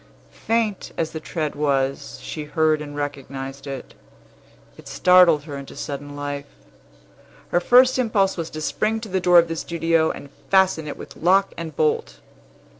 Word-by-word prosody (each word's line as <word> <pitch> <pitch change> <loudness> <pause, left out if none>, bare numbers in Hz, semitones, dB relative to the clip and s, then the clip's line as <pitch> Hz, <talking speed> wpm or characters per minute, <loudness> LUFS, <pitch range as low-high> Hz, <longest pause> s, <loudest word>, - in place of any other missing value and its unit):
Faint 225 -3 0
as 160 - -1
the 160 - -5
tread 155 -2 -3
was, 140 -1 -1
she 155 -2 -5
heard 155 0 +1
and 145 -1 -7
recognized 140 -1 -6
it. 135 -2 -7 0.8
It - - -14
startled 180 -5 +5
her 145 -2 -7
into 140 0 -9
sudden 145 -1 -6
life. 145 0 -5 1.0
Her 175 - +2
first 255 +6 +5
impulse 205 -5 +2
was 165 -2 -4
to 155 - -7
spring 215 +7 -1
to 220 - -7
the 190 0 0
door 180 -1 +5
of 170 0 +6
the 165 - -3
studio, 165 -1 +1
and 140 - -7 0.2
fasten 190 -5 +3
it 145 - -6
with - - -10
lock 195 +4 +3
and 160 -3 -7
bolt. 155 0 0
160 Hz, 165 wpm, -22 LUFS, 145-185 Hz, 1.0 s, of